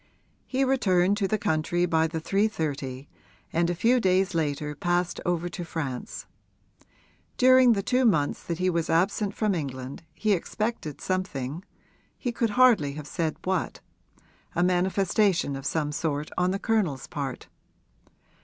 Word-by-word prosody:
He 265 +1 0
returned 200 -8 +3
to 195 - +1
the 215 - 0
country 175 0 0
by 160 -2 +2
the 160 0 -4
3.30 155 -8 -1 0.5
and 170 +1 +2
a 175 - -1
few 240 +8 +3
days 190 -1 +2
later 150 -2 -1
passed 175 +3 -1
over 175 0 0
to 175 - -6
France. 145 -7 -5 1.1
During 255 -1 +6
the 200 -2 -1
two 255 +4 +2
months 155 -12 +2
that 170 - -3
he 185 +1 0
was 170 -2 0
absent 195 +4 +1
from 215 -2 +1
England 135 -5 -5
he 215 - 0
expected 195 -4 -3
something 175 -5 -3 0.5
he 245 - -2
could 230 -1 0
hardly 225 - +5
have 150 0 -7
said 160 +1 -2
what; 185 -2 -1 0.8
a 175 - +2
manifestation 185 -2 +2
of 135 +1 -5
some 150 -2 -1
sort 150 -1 -2
on 180 0 +2
the 190 - 0
Colonel's 195 - 0
part. 140 -4 -5
175 Hz, 145 wpm, -26 LUFS, 155-200 Hz, 1.1 s, During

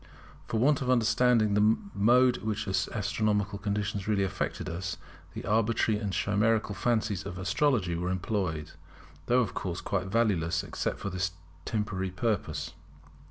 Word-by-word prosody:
For 110 - -1
want 140 +3 +3
of 125 - -1
understanding 120 -2 +3
the 105 +2 +4 0.2
mode 125 +4 +4
in - - -11
which 110 0 -1
astronomical 100 +1 0
conditions 100 -1 -2
really 105 -2 +2
affected 95 - -3
us, 85 -1 -4 0.4
the - - -6
arbitrary 110 0 +2
and 105 -2 -3
chimerical 105 +3 +1
fancies 110 -3 0
of 95 -2 -6
astrology 100 -1 +1
were 90 +2 -2
employed, 90 -4 -2 0.6
though 125 +1 +4
of 110 - -2
course 90 -1 -3
quite 95 -2 -2
valueless 95 -6 +1
except - - -3
for 100 - -4
this 90 0 -1 0.3
temporary 105 -3 -2
purpose. 100 - -2
105 Hz, 145 wpm, -29 LUFS, 95-110 Hz, 0.6 s, the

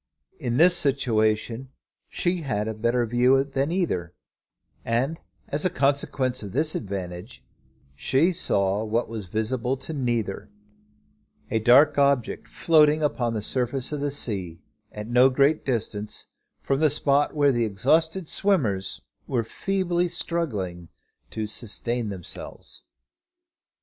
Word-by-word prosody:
In 120 0 -1
this 175 +2 +6
situation 120 -4 0 0.4
she 175 +1 -1
had 125 -10 -2
a 110 - -2
better 120 +3 +1
view 125 +3 +3
than 140 +2 -2
either; 95 - -1 0.7
and, 130 +8 -1 0.3
as 145 +1 -1
a 185 - +3
consequence 135 -3 0
of 100 -3 -7
this 155 +2 +1
advantage, 95 +1 -6 0.5
she 135 - +2
saw 100 - +1
what 110 +2 -1
was 110 -4 -6
visible 115 +6 -1
to 145 +4 -7
neither, 120 -8 -2 1.0
a 110 - +2
dark 140 +6 +5
object 140 -4 +1
floating 155 -1 +3
upon 120 -5 0
the 105 - -3
surface 130 +3 -2
of 150 -2 -3
the 145 - 0
sea 95 -11 -2 0.3
at 105 0 -7
no 125 +2 +5
great 140 +4 +2
distance 110 -4 -4 0.3
from 135 0 0
the 155 -1 +4
spot 145 0 +1
where 145 -1 +4
the 120 -2 +1
exhausted 160 - +1
swimmers 100 - 0 0.3
were 120 -3 0
feebly 180 - -1
struggling 110 - -3 0.4
to 110 - -4
sustain 115 +1 -2
themselves. 95 -4 -8
125 Hz, 130 wpm, -25 LUFS, 110-145 Hz, 1.0 s, this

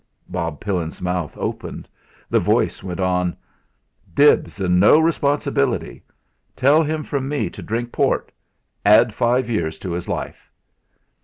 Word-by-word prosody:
Bob 85 -4 -4
Pillin's 90 -5 -3
mouth 90 -3 -3
opened. - - -5 0.4
The - - +2
voice - - +1
went 90 -2 -6
on: 90 -1 0 0.8
"Dibs 145 -6 +4
and 90 -2 +2
no 105 +10 +7
responsibility. 145 -5 0 0.5
Tell 140 +5 +4
him 155 0 -2
from 135 -2 -3
me 145 -1 -1
to - - -10
drink 120 +2 -3
port - - 0 0.5
add 110 +2 +5
five 125 +3 +1
years 85 -9 -2
to 95 - -6
his 85 +1 -4
life." - - -5
105 Hz, 135 wpm, -21 LUFS, 90-140 Hz, 0.8 s, no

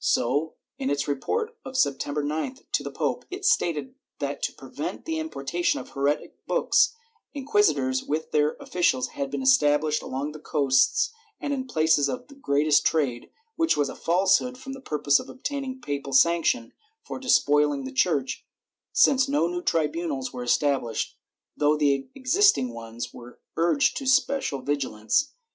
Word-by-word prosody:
^ - - -15
So, 150 - +1 0.2
in 135 - -1
its 140 0 -1
report 440 - -2
of 260 0 -6
September 145 - 0
9th 155 - -3
to - - +1
the - - -5
pope, - - -2
it 375 +1 -6
stated 255 - +1 0.2
that - - -4
to - - -1
prevent - - -7
the 320 -1 -2
importation 175 - -1
of 130 - -9
heretic 140 +2 -2
books, - - +3 0.4
inquisitors 155 - +2
with 155 +2 -3
their 150 0 +2
officials 130 -8 0
had 140 -1 -4
been 140 -1 -3
established 145 +3 +3
along 135 +3 -4
the 155 - -10
coasts 140 - +2 0.3
and 285 - -2
in 260 -1 -3
the - - -12
places 155 -3 +3
of 275 +3 -7
greatest 145 - +3
trade, 135 -7 0 0.3
which 330 0 +2
was 145 -1 +1
a - - -7
false 185 +3 +3
hood 250 0 -6
for 265 +1 -9
the 270 0 -8
purpose 145 - +2
of - - -9
obtaining 270 -1 -5
papal 140 - -4
sanction 165 -5 +3 0.3
for 445 - -6
despoihng 145 - +2
the 130 - -5
Church, 135 0 0 0.5
since 265 0 +4
no 285 - +2
new 175 +1 -2
tribunals 155 -5 -1
were 125 - -5
established, 130 -2 0 0.4
though 150 +1 +2
the 140 -3 +1
existing 260 - +3
ones 115 0 -7
were 120 0 -12 0.2
urged 175 - +2
to 270 - -4
special 260 - +1
vigilance. 145 - 0
150 Hz, 160 wpm, -26 LUFS, -, 0.5 s, since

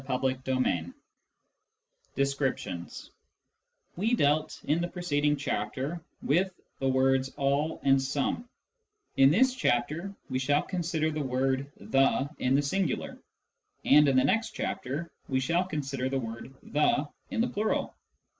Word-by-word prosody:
CHAPTER 130 +1 +1
XVI 130 -10 -1 1.2
DESCRIPTIONS 135 -10 -2 0.8
We 220 +7 +1
dealt 155 -4 +1
in 155 +3 +1
the 175 - 0
preceding 150 -5 0
chapter 145 +3 -3 0.2
with 180 +6 +1 0.2
the 135 - 0
words 130 0 +2
all 140 +3 0
and 135 -1 +4
some; 140 - -2 0.7
in 135 0 +7
this 250 - +4
chapter 160 - 0 0.2
we 130 - -1
shall 145 +3 +2
consider 165 -3 -1
the 155 0 -2
word 135 +1 0
the 135 0 +2
in 130 +1 +2
the 145 - +3
singular, 185 +5 -1 0.7
and 150 +1 +7
in 135 -2 +3
the 130 - +5
next 225 0 +1
chapter 150 +6 -3 0.2
we 130 -1 +1
shall 170 +7 +1
consider 135 -6 -3
the 135 - 0
word 115 +1 -6
the 145 0 +1 0.2
in 260 -3 -3
the 235 - +3
plural. 215 +2 -1
140 Hz, 135 wpm, -29 LUFS, 130-170 Hz, 1.2 s, in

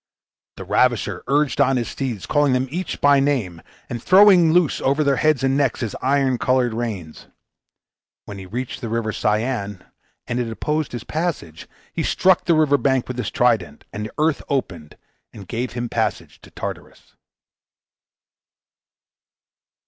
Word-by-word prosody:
The 95 - -7
ravisher 105 -1 +1
urged 145 +1 +1
on 135 0 +3
his 120 - -2
steeds, 125 -8 -4
calling 145 -3 +2
them 130 +1 0
each 180 +4 -4
by 145 -1 +5
name, 120 -12 -1 0.3
and 120 -1 -5
throwing 185 -2 +6
loose 175 -2 +2
over 140 +3 +1
their 140 -2 +2
heads 155 -2 +2
and 135 0 +2
necks 140 -4 0
his 115 -4 -3
iron 135 -2 +1
colored 125 -2 +1
reins. 105 -9 -5 1.0
When 100 -1 -8
he 95 - -9
reached 120 +6 -5
the 115 - -4
River 115 -1 -1
Cyane, 105 -3 -2 0.4
and 120 - -3
it 120 -2 -2
opposed 150 +6 -2
his 120 - -5
passage, 155 - -4 0.3
he - - -2
struck 190 0 +2
the 170 - +3
river 145 -2 +3
bank 130 -2 +1
with 125 -1 -5
his - - -2
trident, 105 -11 0
and 105 - -4
the - - -13
earth 155 0 +1
opened 85 - -3 0.4
and 100 -3 -11
gave 120 +5 -3
him 120 0 -3
a - - -6
passage - - -3
to - - -15
Tartarus. - - -8
125 Hz, 160 wpm, -21 LUFS, 110-145 Hz, 1.0 s, throwing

